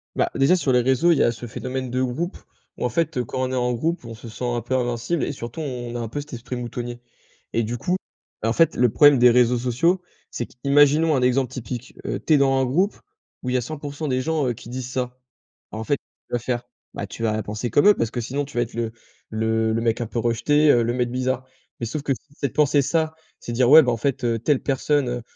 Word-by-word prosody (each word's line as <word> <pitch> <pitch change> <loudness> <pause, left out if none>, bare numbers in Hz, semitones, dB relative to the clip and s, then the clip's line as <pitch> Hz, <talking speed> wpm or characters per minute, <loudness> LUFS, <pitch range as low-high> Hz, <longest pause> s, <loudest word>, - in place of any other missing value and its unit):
Bah, - - +1
déjà 135 +7 +4
sur 160 -7 0
les 125 -1 +4
réseaux, 130 +7 +3
il 165 - +4
y - - +5
a - - +3
ce 120 +1 -8
phénomène 130 +2 -4
de 125 +1 0
groupe, 145 +9 -2 0.4
où - - -2
en - - +1
fait, 160 +3 -1
heu, 125 - 0
quand 130 - -3
on - - -5
est - - -1
en 125 -1 +1
groupe, 160 +4 -2
on 115 -1 -7
se 110 - -11
sent 115 +2 -8
un 120 -1 -1
peu 120 +3 -2
invincible 120 +6 -1
et - - -1
surtout 120 +1 -6
on 125 -5 -5
a - - -2
un 115 - -3
peu 145 - -4
cet 145 0 -9
esprit 120 +1 -5
moutonnier 120 0 -5 0.5
et 115 - +1
du 115 +3 -3
coup, 175 +10 0 0.5
bah 110 - 0
en - - +1
fait 165 +2 +3
le 125 0 +4
problème 145 +3 +6
des 125 0 +7
réseaux 125 0 +4
sociaux, 130 +10 +1 0.3
c'est 120 - -3
qu'imaginons 145 +4 +3
un 130 - +1
exemple 125 0 +2
typique. 125 -1 -6
Heu, - - -2
tu 160 - +1
es - - +7
dans 135 -1 +3
un 130 - +2
groupe 180 +11 +1 0.5
où 125 - -2
il - - -1
y - - +3
a - - 0
100% 145 +2 -5
des 130 -2 0
gens, 155 -1 0
heu, 120 - 0
qui 115 - -12
disent 125 0 -5
ça. 125 0 -3 0.5
Bah - - -6
en - - -3
fait, 145 +5 0
tu - - -22
vas 120 - +2
faire 120 0 -2 0.3
bah - - -3
tu - - -9
vas 110 -1 +1
penser 105 +4 -4
comme 145 - +5
eux 210 - +9
parce 115 -1 -1
que 120 - -3
sinon 140 +5 -2
tu 135 - -10
vas 120 - +3
être 115 - -9
le 115 -1 -2 0.4
le 110 0 0
le 115 - 0
mec 115 0 +1
un 115 - -2
peu 120 - -3
rejeté. 145 +6 +2
Heu, 120 - +4
le 120 +1 0
mec 125 -1 -1
bizarre 130 0 -1 0.3
mais 115 - -2
sauf 145 +6 -3
que 140 - +1
si 140 +4 -13
c'est 140 - -2
de - - -22
penser 145 -1 +3
ça 160 +3 0 0.2
c'est 120 - -6
dire: 125 +1 +3
«Ouais, 155 +3 +10
bah, 125 - +1
en - - -2
fait, 135 +2 -1
heu, 115 -1 +1
telle 135 +4 +1
personne, 140 0 +1
heu, 120 0 -3
125 Hz, 275 wpm, -23 LUFS, 120-145 Hz, 0.5 s, Ouais